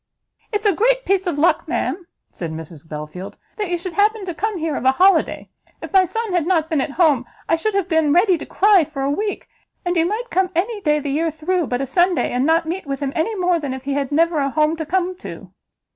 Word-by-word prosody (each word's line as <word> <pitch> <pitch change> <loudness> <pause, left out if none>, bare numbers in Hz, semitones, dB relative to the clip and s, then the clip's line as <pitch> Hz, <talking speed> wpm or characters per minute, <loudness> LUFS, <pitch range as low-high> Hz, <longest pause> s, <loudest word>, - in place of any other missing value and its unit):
"Its 420 -1 -2
a 410 - +4
great - - +2
piece 385 -1 +1
of 340 - -1
luck, 325 +4 +2
ma'am," 355 -1 -2 0.2
said 170 -3 -6
Mrs 160 0 -9
Belfield, 155 +5 -7 0.2
"that 415 -4 -2
you 350 - 0
should 350 +1 -6
happen 415 +1 +2
to 355 - -4
come 425 +4 -2
here, 320 -3 -2
of - - -3
a 260 0 +4
holiday! 375 +6 +3 0.3
If - - -9
my 380 -1 +6
son 450 +2 -3
had 345 -3 +1
not 330 -3 +1
been 305 -4 +2
at 280 - -3
home, 300 -8 +4 0.2
I - - +3
should 400 +6 -2
have 395 -3 +1
been 320 -4 +2
ready 360 +4 +4
to - - -7
cry 400 -3 +4
for 285 -2 -5
a 275 - +1
week: 410 +7 -3 0.4
and 355 0 0
you 330 0 +3
might 465 +5 -3
come 375 0 +2
any 410 +5 -1
day 300 -4 +2
the 290 -1 -3
year 325 +4 +1
through 320 +2 -1
but 245 +1 -1
a - - -1
Sunday, 350 +5 +2
and 250 +3 +1
not 325 +1 +3
meet 340 0 -4
with 275 -1 -3
him 280 -1 -3
any 380 +8 0
more 360 -3 +1
than 280 -4 -4
if 260 - -9
he 280 0 -2
had 275 -1 -2
never 330 +1 +2
a 275 -1 +1
home 305 +3 +1
to 320 -2 -5
come 370 +1 0
to." - - -10
335 Hz, 250 wpm, -20 LUFS, 285-380 Hz, 0.4 s, my